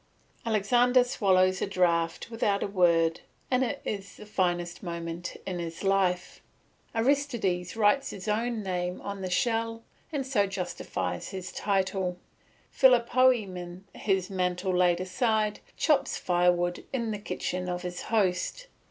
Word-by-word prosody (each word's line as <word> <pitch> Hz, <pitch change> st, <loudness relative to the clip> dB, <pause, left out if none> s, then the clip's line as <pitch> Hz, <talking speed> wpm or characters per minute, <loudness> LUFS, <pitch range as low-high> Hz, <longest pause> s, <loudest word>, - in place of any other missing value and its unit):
Alexander 245 Hz, +4 st, +4 dB
swallows 190 Hz, -6 st, +2 dB
a -, -, 0 dB
draught 170 Hz, +1 st, +1 dB
without 205 Hz, -3 st, +1 dB
a -, -, -1 dB
word 170 Hz, -4 st, +3 dB, 0.3 s
it 260 Hz, +2 st, +1 dB
is 200 Hz, -2 st, -4 dB
the 210 Hz, -, -10 dB
finest 175 Hz, -4 st, -1 dB
moment 170 Hz, -1 st, -5 dB
in 180 Hz, -2 st, -3 dB
his 170 Hz, +1 st, -5 dB
life; 190 Hz, -2 st, +1 dB, 0.5 s
Aristides 225 Hz, -8 st, 0 dB
writes 225 Hz, +5 st, +3 dB
his 195 Hz, -, -8 dB
own 225 Hz, +1 st, 0 dB
name 180 Hz, -1 st, -2 dB
on 200 Hz, -1 st, -5 dB
the 185 Hz, -, -3 dB
shell 225 Hz, +3 st, 0 dB, 0.3 s
and 285 Hz, -4 st, -2 dB
so 220 Hz, -7 st, +2 dB
justifies 190 Hz, -2 st, -4 dB
his 185 Hz, -1 st, -6 dB
title; 190 Hz, -2 st, -1 dB, 0.5 s
Philopoemen, 235 Hz, -8 st, +3 dB
his 190 Hz, -3 st, 0 dB
mantle 180 Hz, 0 st, 0 dB
laid 175 Hz, -1 st, +3 dB
aside, 215 Hz, +2 st, 0 dB, 0.2 s
chops 275 Hz, -3 st, +2 dB
firewood 175 Hz, 0 st, +1 dB
in 235 Hz, -4 st, -1 dB
the 210 Hz, -, -3 dB
kitchen 180 Hz, -2 st, -3 dB
of 180 Hz, 0 st, -3 dB
his 180 Hz, 0 st, -5 dB
host. 210 Hz, -, 0 dB
195 Hz, 130 wpm, -28 LUFS, 180-225 Hz, 0.5 s, Alexander